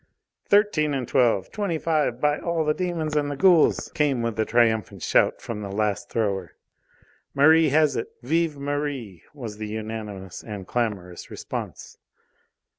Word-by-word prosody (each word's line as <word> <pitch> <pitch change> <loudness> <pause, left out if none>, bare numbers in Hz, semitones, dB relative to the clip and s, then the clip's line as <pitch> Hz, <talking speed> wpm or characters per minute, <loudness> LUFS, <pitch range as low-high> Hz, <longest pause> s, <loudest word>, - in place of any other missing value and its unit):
"Thirteen 200 -8 +3
and 130 -3 -3
twelve! 115 -7 +2
Twenty 200 -6 -2
five, 155 -6 0
by 150 +1 +1
all 170 -2 -1
the 150 - +2
demons 165 -3 -2
and 145 -1 +1
the 145 - -3
ghouls!" 175 -2 +4
came 145 -7 +1
with 115 -1 -3
a 110 - +2
triumphant 110 -3 +1
shout - - +2
from 110 -2 -5
the 100 -1 -5
last 105 0 -1
thrower. 100 -6 -2 0.8
"Merri 160 +3 +6
has 150 +1 +3
it! - - -2 0.2
Vive 165 -2 0
Merri!" 140 - -4
was 115 -7 -7
the 110 0 -5
unanimous 105 -4 -6
and 105 -4 -7
clamorous 100 -7 -3
response. - - -7
130 Hz, 150 wpm, -24 LUFS, 110-155 Hz, 0.8 s, Merri